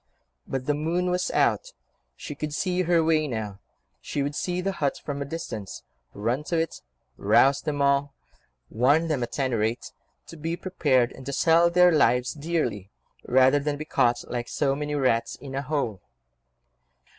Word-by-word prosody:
But 135 -1 -3
the 145 - +1
moon 170 +5 -1
was 180 0 0
out: - - +1 0.4
she 150 - -7
could 150 0 -5
see 185 0 0
her 170 -2 +3
way 155 -1 +2
now: 110 -6 -4 0.4
she 140 - -2
would 145 +1 -2
see 180 +4 -2
the 195 +2 -1
hut 145 -7 -1
from 140 -1 -4
a - - -2
distance, 135 - -6 0.3
run 120 +8 -1
to 170 - -1
it, 165 -1 -2 0.4
rouse 140 +1 +4
them 145 -2 -1
all, 140 0 +1 0.6
warn 145 +8 +3
them 145 -5 0
at 120 - -4
any 130 -3 0
rate 115 +2 -1 0.3
to 165 - -11
be 165 +3 -3
prepared 135 -11 +1
and 130 - -11
to 140 - -3
sell 165 +4 +4
their 180 +1 +5
lives 125 -5 +3
dearly, 150 - -2 0.4
rather 130 +3 +5
than 145 0 -2
be 155 - -6
caught 120 -5 +1
like 120 -1 -4
so 135 -1 0
many 150 +1 -3
rats 130 -5 +1
in 135 -2 -10
a 135 - -1
hole. 130 - -2
145 Hz, 175 wpm, -26 LUFS, 130-165 Hz, 0.6 s, their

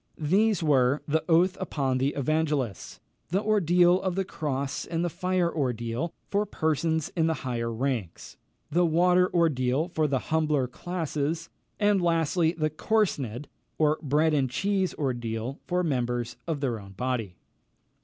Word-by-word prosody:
These 195 +5 +2
were, 140 -2 +3
the 155 +1 +1
oath 175 +3 +4
upon 135 -8 -1
the 135 +2 0
evangelists; 145 - -1 0.3
the 190 +5 0
ordeal 180 -3 +4
of 185 -2 -1
the 195 0 0
cross 140 -5 -3
and 170 0 -2
the 175 - -2
fire 180 0 0
ordeal, 125 +2 -2 0.2
for 200 +1 +1
persons 160 0 0
in 165 -2 0
the 160 - +1
higher 115 -2 -2
ranks; 115 -7 -3 0.4
the 175 +4 +3
water 180 +2 +3
ordeal, 150 -2 +1
for 155 -3 +1
the 135 -2 +1 0.2
humbler 155 -4 +2
classes; 165 +1 -3 0.3
and, 205 -2 +3
lastly, 165 -1 +2
the 155 -3 -1
corsned, 150 - -1 0.3
or 155 0 +2
bread 155 +2 +2
and 135 -3 +2
cheese 190 +7 0
ordeal, 120 -1 -3
for 180 0 +1
members 120 -5 -1
of 155 -4 -2
their 120 -5 -1
own 100 -1 -12
body. 115 -4 -3
155 Hz, 145 wpm, -27 LUFS, 130-175 Hz, 0.4 s, oath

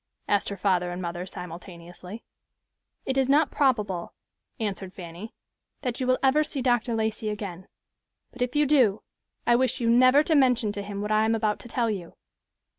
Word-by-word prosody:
asked 205 -1 +1
her 200 - -5
father 180 -2 +1
and 175 +1 -5
mother, 175 0 -4
simultaneously. 180 +3 -9 0.8
"It 265 0 0
is 265 0 +1
not 290 +2 +4
probable," 210 -11 0 0.4
answered 195 -3 -4
Fanny, 175 +4 -9 0.5
"that 250 -3 -2
you 255 - -1
will 255 0 +3
ever 280 +3 +4
see 295 -2 -5
Dr. 240 -2 +1
Lacey 220 0 -1
again, 195 -3 -6 0.6
but 250 - -12
if 250 +2 -1
you 295 0 +4
do, 255 -8 +3 0.4
I 240 - +4
wish 255 +1 +1
you 230 -1 +2
never 255 +4 +6
to 320 - +1
mention 250 -7 +3
to 205 0 -5
him 200 0 -5
what 210 - -3
I 215 0 +3
am 225 +1 +2
about 215 -2 0
to - - -10
tell 235 -1 0
you." 185 -5 -6
220 Hz, 185 wpm, -26 LUFS, 190-255 Hz, 0.8 s, never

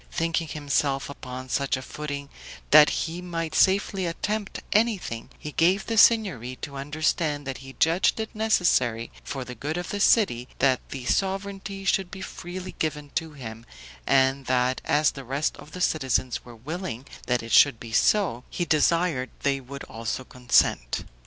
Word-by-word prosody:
Thinking 165 0 -1
himself 140 -2 -1
upon 130 -2 -8
such 140 +1 0
a - - -6
footing 145 -1 -6 0.4
that 150 0 +9 0.2
he 170 +1 -5
might 165 -3 -4
safely 190 +1 +2
attempt 205 +5 -3
anything, 210 - 0
he 150 - -7
gave 180 +6 +2
the 230 - -2
Signory 195 - +4
to 140 - -5
understand 145 +1 -1
that 135 -1 -5
he 135 0 -11
judged 165 +6 +3
it 220 - -4
necessary 170 - +2
for 135 -2 -5
the 125 - -7
good 145 +7 -4
of 175 - -4
the 205 - -3
city, 160 - +3
that 130 -2 +3
the 130 -3 -6
sovereignty 195 +3 -2
should 195 -2 +1
be 190 0 -8
freely 185 +1 -7
given 150 -2 -2
to 160 -1 -2
him, 115 -5 -8 0.4
and 135 0 +3
that 130 0 +1
as 150 0 +3
the 135 - -9
rest 135 +4 -1
of 150 - -13
the 180 - -7
citizens 130 -7 0
were 120 -1 -12
willing 135 - -5 0.2
that 125 -2 +1
it 115 - -8
should 140 -6 +6
be 115 - -9
so, 160 - +2
he 175 - -2
desired 155 -4 +2
they 140 -1 +1
would 140 +2 -8
also 115 +3 -4
consent. 120 - +1
150 Hz, 165 wpm, -26 LUFS, 130-180 Hz, 0.4 s, that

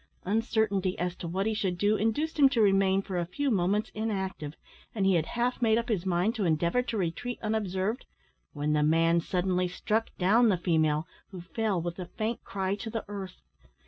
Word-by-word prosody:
Uncertainty 205 -2 0
as 180 0 -2
to 175 - -6
what 190 +4 -1
he 220 - +1
should 195 -4 -1
do 205 +3 +2
induced 290 +10 -1
him 275 -2 +7
to 260 -4 0
remain 195 -2 +4
for 185 -2 -3
a 170 - -1
few 280 +9 -1
moments 200 +1 +1
inactive, 190 -8 -3 0.4
and 200 -3 +1
he 195 - +4
had 165 -3 +1
half 245 +2 0
made 225 -2 +4
up 235 +1 -2
his 190 -5 -1
mind 180 +5 +1
to 220 -4 -2
endeavour 170 +7 +2
to 235 -2 -4
retreat 195 +7 -2
unobserved, 215 +1 -1 0.4
when 150 +1 -1
the 150 - +2
man 165 +2 +3
suddenly 180 +1 0
struck 215 +5 -1
down 220 +5 +4
the 190 - +2
female, 155 -3 +1 0.2
who 190 - -8
fell 200 +2 -1
with 170 +2 -4
a 180 - -5
faint 220 +5 -3
cry 190 -1 -2
to 210 +3 -5
the 225 0 -4
earth. 195 -2 -7
195 Hz, 200 wpm, -29 LUFS, 175-220 Hz, 0.4 s, him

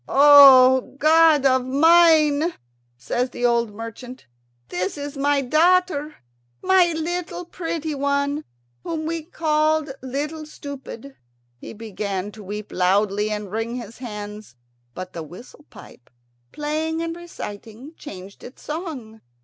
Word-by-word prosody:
"O 270 -3 +7
God 310 -1 +4
of 260 -1 +3
mine," 315 +2 +4 0.4
says 245 - -2
the 245 - -3
old 235 -2 +1
merchant, 230 +4 -9 0.4
"this 180 +6 -3
is 285 0 -6
my 285 0 +1
daughter, 310 +1 +2 0.5
my 370 -2 +4
little 350 +2 -4
pretty 330 -3 -4
one, 280 +1 -1 0.4
whom 315 -1 -4
we 330 0 -3
called 310 -2 0
Little 295 +4 -5
Stupid." 280 -3 -10 0.4
He - - -9
began 205 -2 -5
to 215 - -13
weep 210 +1 -7
loudly 200 +3 +1
and 210 -2 -5
wring 225 +2 -3
his 235 -2 -9
hands; 210 - -8 0.4
but 185 0 -8
the 165 - -6
whistle 185 - -13
pipe, 125 - -16 0.4
playing 315 +2 -3
and 330 0 -4
reciting, 250 -5 -9
changed 195 -10 -11
its 250 - -13
song. 290 - -7
275 Hz, 125 wpm, -22 LUFS, 220-315 Hz, 0.5 s, O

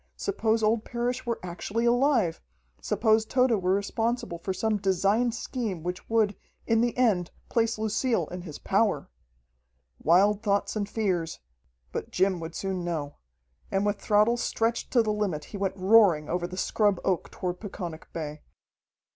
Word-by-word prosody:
Suppose 225 - 0
old 215 +1 +2
Parrish 245 +1 -3
were 235 - -1
actually 200 +6 -3
alive, 240 - +2 0.4
suppose 220 -1 +2
Tode 245 -2 +2
were 185 +1 +2
responsible 225 -2 -2
for 190 - -3
some 215 +3 0
designed 200 +5 +1
scheme 220 - -4
which 180 +1 -5
would, 220 -3 +2 0.3
in 225 -1 +3
the 240 0 0
end 205 -9 +2 0.2
place 230 -1 +1
Lucille 220 +3 0
in 180 0 -5
his 160 -5 -8
power! - - 0 0.9
Wild 195 +6 +4
thoughts 200 -1 0
and 205 -1 -2
fears 185 -8 -1 0.5
but - - -4
Jim 190 -1 +1
would 165 0 -7
soon 190 -2 -3
know. 155 -4 -3 0.5
And 195 +1 0
with 205 -1 -1
throttle 215 +3 +3
stretched 230 0 -1
to 240 -3 +5
the 215 -1 0
limit 195 -8 -1
he - - -3
went 195 0 -2
roaring 190 -6 +5
over 175 +1 -1
the 180 +1 -8
scrub 205 -1 +1
oak 185 -3 0
toward 180 -1 -4
Peconic 175 -6 -7
Bay. 150 -2 -5
205 Hz, 155 wpm, -27 LUFS, 180-225 Hz, 0.9 s, to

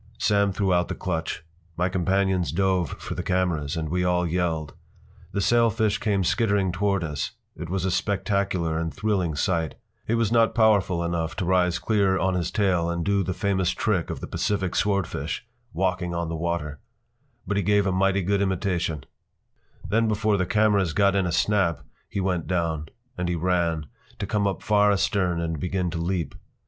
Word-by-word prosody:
Sam 100 -1 +2
threw 95 -1 +1
out 90 0 +2
the - - -4
clutch. 80 -3 -3 0.3
My 90 +1 +2
companions 95 0 +1
dove 95 -5 +1
for - - -6
the - - -3
cameras, 85 -6 0
and 80 -1 -2
we 90 +2 0
all 90 0 +2
yelled. 80 -3 -1 0.6
The 100 - -1
sailfish 115 -1 +2
came 100 -3 +1
skittering 100 0 +1
toward 100 0 0
us. 75 -3 -3 0.2
It 85 - -7
was 95 0 -1
a 95 - +1
spectacular 95 -5 0
and 80 -1 -2
thrilling 95 -6 -1
sight. 80 +1 0 0.3
He 115 - +1
was 115 -2 +1
not 115 -1 +3
powerful 100 -6 +3
enough 85 -1 -2
to 95 - -2
rise 90 -1 +2
clear 100 -4 +2
on 95 +1 +1
his 90 -2 -1
tail 90 -5 +1
and 85 0 -2
do 100 -1 +2
the 95 -1 -2
famous 95 -1 +1
trick 100 -6 0
of - - -5
the - - -4
Pacific 95 -3 -1
swordfish—“walking 95 - -2
on 85 -1 -2
the 85 - -3
water.” 80 -3 -3 0.7
But 105 - -1
he - - +2
gave 105 +1 +3
a 95 - +1
mighty 95 +1 +2
good 100 +2 +1
imitation. 90 -5 -1 0.8
Then 110 +5 +2
before 105 0 +1
the 95 -2 0
cameras 100 -5 +2
got 100 +1 +3
in 95 -2 +2
a - - -1
snap 90 -1 +1 0.3
he - - -3
went 90 -4 -1
down. 85 -4 -1 0.3
And 90 0 -1
he 90 - 0
ran, 85 -2 0 0.3
to - - -3
come 100 0 0
up 95 - -3
far 105 -1 +4
astern 95 -3 +1
and 80 -2 -2
begin 90 +1 -1
to 85 - -3
leap. 85 0 -2
95 Hz, 180 wpm, -25 LUFS, 85-100 Hz, 0.8 s, far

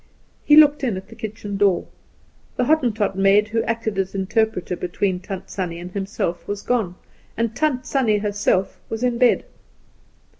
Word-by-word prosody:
He 295 - +6
looked 295 -2 +6
in 230 -7 0
at 190 +1 -9
the 225 - -12
kitchen 215 -2 -6
door. 195 -3 +2 0.7
The 250 - +1
Hottentot 240 -9 +1
maid 195 +2 +4
who 225 +1 0
acted 225 -3 -2
as 190 0 -2
interpreter 195 -1 0
between 180 +1 -1
Tant 190 0 -7
Sannie 180 -4 -3
and 175 +1 -8
himself 195 -3 -3
was 205 0 -4
gone, 220 -8 0 0.4
and 230 0 -1
Tant 265 -3 0
Sannie 235 -6 +2
herself 205 -2 0
was 225 +2 -4
in 245 -1 +1
bed. 250 -2 +4
210 Hz, 160 wpm, -22 LUFS, 195-235 Hz, 0.7 s, He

